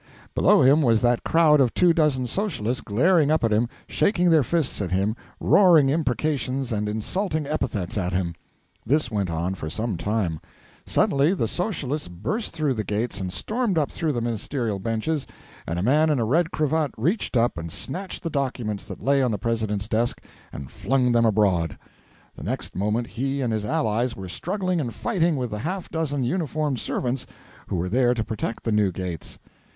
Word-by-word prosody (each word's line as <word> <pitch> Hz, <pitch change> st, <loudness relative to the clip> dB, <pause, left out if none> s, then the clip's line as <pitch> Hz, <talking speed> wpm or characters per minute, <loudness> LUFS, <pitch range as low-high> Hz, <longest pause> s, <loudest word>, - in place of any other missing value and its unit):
Below -, -, +5 dB
him 140 Hz, +4 st, +6 dB
was 115 Hz, -5 st, +4 dB
that 120 Hz, -1 st, +2 dB
crowd 155 Hz, -3 st, +4 dB
of 125 Hz, -3 st, +2 dB
two 175 Hz, -2 st, +5 dB
dozen 150 Hz, -6 st, +2 dB
Socialists 130 Hz, -, -2 dB
glaring 150 Hz, -, +3 dB
up 155 Hz, -3 st, +2 dB
at 115 Hz, -, +2 dB
him, 115 Hz, +3 st, +2 dB, 0.2 s
shaking 180 Hz, -4 st, +2 dB
their 160 Hz, -2 st, +6 dB
fists 150 Hz, -3 st, -1 dB
at 95 Hz, -, -2 dB
him, 100 Hz, +4 st, 0 dB, 0.2 s
roaring 170 Hz, -8 st, +5 dB
imprecations 135 Hz, -3 st, -1 dB
and 105 Hz, -1 st, -1 dB
insulting 155 Hz, -, -2 dB
epithets 110 Hz, -, -2 dB
at 90 Hz, -1 st, -1 dB
him. 90 Hz, -2 st, -1 dB, 0.5 s
This 145 Hz, -3 st, +1 dB
went 100 Hz, -4 st, -1 dB
on 85 Hz, +3 st, -1 dB
for 80 Hz, -4 st, -5 dB
some 110 Hz, +2 st, -2 dB
time. 90 Hz, -3 st, -1 dB, 0.5 s
Suddenly 145 Hz, +7 st, +3 dB
the 115 Hz, -, 0 dB
Socialists 155 Hz, -, -2 dB
burst 105 Hz, -, -3 dB
through 155 Hz, -4 st, 0 dB
the 110 Hz, -3 st, -2 dB
gates 105 Hz, +1 st, -2 dB
and 90 Hz, -1 st, -3 dB
stormed 215 Hz, -, -1 dB
up 150 Hz, -3 st, +1 dB
through 160 Hz, -2 st, -1 dB
the 120 Hz, -4 st, -2 dB
ministerial 115 Hz, -1 st, -2 dB
benches, 115 Hz, +8 st, -2 dB, 0.4 s
and 85 Hz, -, -2 dB
a 90 Hz, -, -1 dB
man 150 Hz, +7 st, +4 dB
in 150 Hz, -, +2 dB
a 115 Hz, -, +1 dB
red 165 Hz, +8 st, +2 dB
cravat 155 Hz, -2 st, 0 dB
reached 155 Hz, -, 0 dB
up 120 Hz, +1 st, +2 dB
and 85 Hz, -1 st, -6 dB
snatched 185 Hz, -, -3 dB
the 165 Hz, -, -3 dB
documents 125 Hz, -7 st, -2 dB
that -, -, -9 dB
lay 140 Hz, 0 st, +3 dB
on 125 Hz, -, +2 dB
the 105 Hz, -, -1 dB
President's 110 Hz, -1 st, -1 dB
desk 115 Hz, +2 st, 0 dB, 0.3 s
and 70 Hz, -2 st, -8 dB
flung 130 Hz, -1 st, +1 dB
them 115 Hz, -1 st, +4 dB
abroad. 95 Hz, -7 st, +2 dB, 0.6 s
The -, -, -11 dB
next -, -, -4 dB
moment 105 Hz, +5 st, 0 dB
he 135 Hz, +5 st, -3 dB
and 120 Hz, -3 st, 0 dB
his 110 Hz, -1 st, -1 dB
allies 115 Hz, +3 st, 0 dB
were 95 Hz, -1 st, -7 dB
struggling 185 Hz, -, -1 dB
and 120 Hz, -5 st, -3 dB
fighting 175 Hz, -8 st, +1 dB
with 125 Hz, -3 st, -3 dB
the 105 Hz, -, -3 dB
half 180 Hz, -, -4 dB
dozen 145 Hz, -4 st, -1 dB
uniformed 150 Hz, -2 st, -1 dB
servants 125 Hz, +3 st, -2 dB, 0.4 s
who -, -, -2 dB
were 90 Hz, +1 st, -1 dB
there 125 Hz, +4 st, +2 dB
to 110 Hz, -, -1 dB
protect 110 Hz, 0 st, -4 dB
the 115 Hz, -, -1 dB
new 105 Hz, -2 st, +3 dB
gates. 90 Hz, -3 st, -5 dB
125 Hz, 190 wpm, -24 LUFS, 105-155 Hz, 0.6 s, him